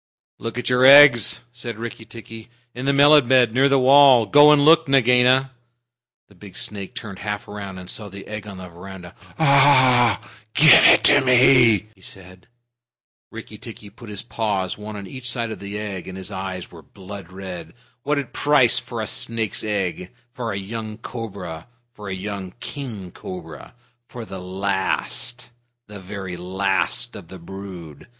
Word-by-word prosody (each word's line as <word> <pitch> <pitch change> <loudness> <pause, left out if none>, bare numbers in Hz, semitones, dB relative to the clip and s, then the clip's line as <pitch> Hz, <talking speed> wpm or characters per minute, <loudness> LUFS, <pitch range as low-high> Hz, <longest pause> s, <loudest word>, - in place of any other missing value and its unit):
"Look 115 +1 -6
at 125 - -4
your 125 0 +2
eggs," 135 -4 +7
said 120 -2 -7
Rikki 115 0 -8
tikki, 115 0 -12 0.2
"in 125 +3 -6
the - - +3
melon 145 -1 +5
bed 125 -3 +3
near 135 +3 +3
the 140 - +3
wall. 135 -2 +5
Go 145 +7 +6
and 145 -1 +3
look, 165 0 +5
Nagaina!" 130 0 +3 0.8
The - - -22
big 100 0 -14
snake 100 -2 -5
turned 100 -4 -9
half 105 +1 -5
around, 100 -2 -8
and 90 -1 -11
saw 105 +2 -4
the 100 0 -11
egg 105 0 -8
on 100 -2 -9
the 95 0 -10
veranda. 90 0 -12 0.2
"Ah 130 - +4
h! - - -20 0.2
Give 155 +1 +7
it - - +6
to 145 -1 +5
me," 125 -4 +4
she 95 - -26
said. 90 -1 -13 0.8
Rikki 110 -2 -11
tikki 110 -3 -11
put 120 - -14
his 105 -2 -7
paws 100 -6 -3
one 105 0 -9
on 100 -1 -8
each 125 +5 -7
side 120 -2 -4
of - - -8
the 100 +1 -7
egg, 100 -4 -7
and 95 - -8
his 95 +2 -8
eyes 95 -2 -7
were 85 - -13
blood 95 0 -12
red. 95 0 -9 0.3
"What 140 -1 -3
price 145 -5 +2
for 115 -2 -7
a - - -3
snake's 115 -1 -3
egg? 95 -4 -4 0.2
For 120 -4 -5
a 100 - -4
young 110 +2 -7
cobra? 100 -9 -8 0.3
For 105 -1 -10
a 95 - -4
young 95 -1 -7
king 115 - -8
cobra? 80 -7 -11 0.3
For 120 -2 -9
the 95 -3 -9
last 100 +6 -3 0.3
the 105 -1 -11
very 95 -1 -8
last 95 +2 -2
of - - -11
the 95 - -11
brood? 90 -4 -11
105 Hz, 170 wpm, -21 LUFS, 95-125 Hz, 0.8 s, eggs